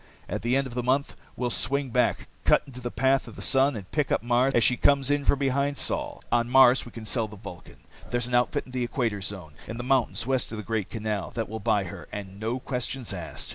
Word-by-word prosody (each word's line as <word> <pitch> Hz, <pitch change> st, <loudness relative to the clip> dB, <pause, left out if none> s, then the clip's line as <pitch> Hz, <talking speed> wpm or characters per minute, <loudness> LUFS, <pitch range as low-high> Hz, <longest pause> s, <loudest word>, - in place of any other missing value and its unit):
"At -, -, -3 dB
the 120 Hz, +3 st, +1 dB
end 135 Hz, -, +1 dB
of 130 Hz, -, -7 dB
the 125 Hz, -, -1 dB
month, 130 Hz, +3 st, 0 dB, 0.2 s
we'll 125 Hz, -1 st, -1 dB
swing 140 Hz, +1 st, 0 dB
back, 125 Hz, +1 st, +1 dB, 0.2 s
cut -, -, +4 dB
into 125 Hz, -2 st, -10 dB
the 120 Hz, -, -3 dB
path 135 Hz, +4 st, +2 dB
of -, -, -10 dB
the -, -, -8 dB
sun, 135 Hz, 0 st, +3 dB
and 100 Hz, -4 st, -8 dB
pick 150 Hz, -3 st, 0 dB
up -, -, +1 dB
Mars 125 Hz, +3 st, +2 dB
as 120 Hz, -, +4 dB
she 125 Hz, -, +4 dB
comes 140 Hz, +1 st, +3 dB
in 145 Hz, -1 st, +1 dB
from -, -, +4 dB
behind 140 Hz, +1 st, 0 dB
Sol. -, -, -1 dB
"On 120 Hz, 0 st, +2 dB
Mars, 130 Hz, -1 st, +6 dB
we -, -, -10 dB
can 115 Hz, -1 st, -9 dB
sell 110 Hz, +2 st, 0 dB
the 105 Hz, -, -11 dB
Vulcan. 100 Hz, -4 st, -11 dB, 0.3 s
There's 120 Hz, -1 st, 0 dB
an 125 Hz, -, -5 dB
outfit 120 Hz, 0 st, +2 dB
in 130 Hz, -, -13 dB
the 125 Hz, -1 st, -1 dB
Equator 115 Hz, -4 st, -1 dB
Zone, 95 Hz, -6 st, -5 dB
in 115 Hz, -, -5 dB
the 120 Hz, -, -4 dB
mountains 130 Hz, -3 st, +1 dB
west 130 Hz, -3 st, 0 dB
of 110 Hz, -, -5 dB
the 105 Hz, -, -5 dB
Great 110 Hz, -3 st, -2 dB
Canal, 105 Hz, -4 st, -3 dB
that 115 Hz, -2 st, -2 dB
will 110 Hz, +1 st, -5 dB
buy 105 Hz, -1 st, +2 dB
her 90 Hz, -, -8 dB
and 100 Hz, -1 st, -7 dB
no 115 Hz, +3 st, -1 dB
questions 125 Hz, -2 st, -3 dB
asked. 85 Hz, -4 st, -5 dB
120 Hz, 255 wpm, -27 LUFS, 110-130 Hz, 0.3 s, Mars